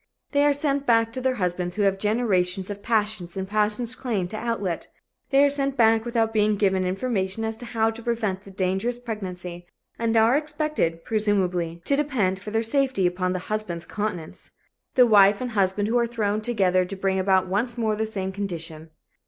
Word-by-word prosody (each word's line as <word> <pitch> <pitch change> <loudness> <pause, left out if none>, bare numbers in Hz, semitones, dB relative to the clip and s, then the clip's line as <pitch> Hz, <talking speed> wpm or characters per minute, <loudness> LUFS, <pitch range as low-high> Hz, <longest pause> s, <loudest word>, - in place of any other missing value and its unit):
They 285 -1 +3
are 290 - +5
sent 280 -1 -1
back 230 -1 +3
to 255 +1 0
husbands 180 -3 -2
who 210 - 0
have 195 -1 +2
generations 195 -4 0
of 205 0 -7
passion 215 -5 0
and 190 0 -3
passion's 215 +3 0
claim 230 -8 -2
to 215 - -7
outlet. 215 -6 -2 0.4
They 275 0 +5
are - - +4
sent 275 -1 -1
back 225 -1 +4
without 230 -2 0
being 215 -1 +3
given 190 -2 +1
information 195 0 -1
as 220 0 -2
to 240 - -9
how 225 -1 +1
to 225 +1 -10
prevent 220 -5 -1
the 195 - -14
dangerous 190 +5 -1
pregnancy 185 -7 -6 0.3
and 230 -1 +1
are 225 +3 +5
expected, 300 - -1
presumably, 180 -6 0
to 280 - +2
depend 245 -11 0
for 200 - -7
their 225 +1 0
safety 260 -4 +1
upon 180 +1 0
the - - -1 0.2
husband's 175 -6 -3
continence. 185 -7 -5 0.4
The 250 - +7
wife 205 -3 +6
and 250 -1 -4
husband 200 -1 +1
are 240 -1 +3
thrown 215 -2 -1
together 195 -5 +2
to 185 +2 -6
bring 190 0 0
about 190 0 +3
once 230 +6 -1
more 220 -2 0
the 220 +1 -1
same 190 -3 -3
condition. 165 -5 -6
210 Hz, 185 wpm, -24 LUFS, 190-235 Hz, 0.4 s, The